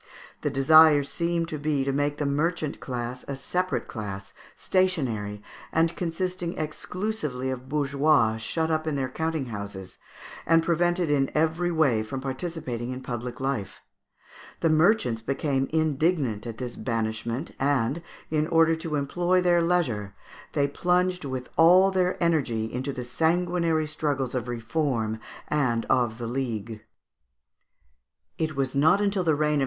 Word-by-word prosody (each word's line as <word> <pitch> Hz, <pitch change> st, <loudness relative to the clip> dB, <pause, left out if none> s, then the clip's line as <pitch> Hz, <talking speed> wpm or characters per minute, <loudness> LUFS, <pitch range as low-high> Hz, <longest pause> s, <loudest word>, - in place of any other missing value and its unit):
The 145 Hz, -, 0 dB
desire 145 Hz, +2 st, +6 dB
seemed 170 Hz, +3 st, -1 dB
to 155 Hz, -, -4 dB
be 145 Hz, -2 st, 0 dB
to 135 Hz, 0 st, -1 dB
make 145 Hz, +1 st, 0 dB
the 150 Hz, -, -1 dB
merchant 155 Hz, +2 st, -1 dB
class 125 Hz, 0 st, -5 dB
a 140 Hz, -, -3 dB
separate 180 Hz, +7 st, -2 dB
class, 100 Hz, -3 st, -6 dB, 0.2 s
stationary, 120 Hz, -, 0 dB, 0.3 s
and 165 Hz, +1 st, +2 dB
consisting 175 Hz, 0 st, -3 dB
exclusively 155 Hz, -4 st, -3 dB
of 130 Hz, 0 st, -6 dB
bourgeois, 140 Hz, -5 st, +2 dB
shut 160 Hz, +9 st, -1 dB
up 155 Hz, 0 st, 0 dB
in 155 Hz, -, 0 dB
their 135 Hz, -2 st, -1 dB
counting 160 Hz, +1 st, -2 dB
houses, 100 Hz, -2 st, -7 dB, 0.5 s
and 165 Hz, 0 st, +5 dB
prevented 175 Hz, -1 st, +1 dB
in 135 Hz, -2 st, +2 dB
every 160 Hz, +3 st, +1 dB
way 140 Hz, -9 st, +3 dB
from 110 Hz, +5 st, -5 dB
participating 130 Hz, -3 st, -4 dB
in 130 Hz, 0 st, -5 dB
public 120 Hz, 0 st, -5 dB
life. 130 Hz, -8 st, -3 dB, 0.8 s
The 165 Hz, -, +3 dB
merchants 155 Hz, -, +3 dB
became 135 Hz, +2 st, -1 dB
indignant 155 Hz, -, +1 dB
at 115 Hz, -1 st, -6 dB
this 125 Hz, 0 st, -6 dB
banishment, 115 Hz, +3 st, -2 dB
and, 135 Hz, +2 st, +1 dB, 0.3 s
in 155 Hz, 0 st, +1 dB
order 165 Hz, -1 st, +4 dB
to 160 Hz, -1 st, -3 dB
employ 175 Hz, +6 st, +1 dB
their 175 Hz, -1 st, +3 dB
leisure, 125 Hz, -, 0 dB, 0.4 s
they 140 Hz, -1 st, +2 dB
plunged 180 Hz, +3 st, +1 dB
with 130 Hz, -2 st, -4 dB
all 180 Hz, +4 st, +7 dB
their 185 Hz, -1 st, +1 dB
energy 140 Hz, -10 st, +1 dB
into 130 Hz, +3 st, -2 dB
the 125 Hz, -2 st, -5 dB
sanguinary 165 Hz, +3 st, +1 dB
struggles 145 Hz, -4 st, -2 dB
of 125 Hz, -2 st, -2 dB
Reform 115 Hz, -2 st, -1 dB, 0.3 s
and 125 Hz, -6 st, +1 dB
of 120 Hz, -4 st, +2 dB
the 120 Hz, -, -5 dB
League. 115 Hz, -3 st, -3 dB, 1.6 s
[Illustration: 140 Hz, -4 st, 0 dB, 0.3 s
Fig. -, -, -5 dB
200. 155 Hz, -5 st, +1 dB
145 Hz, 140 wpm, -26 LUFS, 125-165 Hz, 1.6 s, all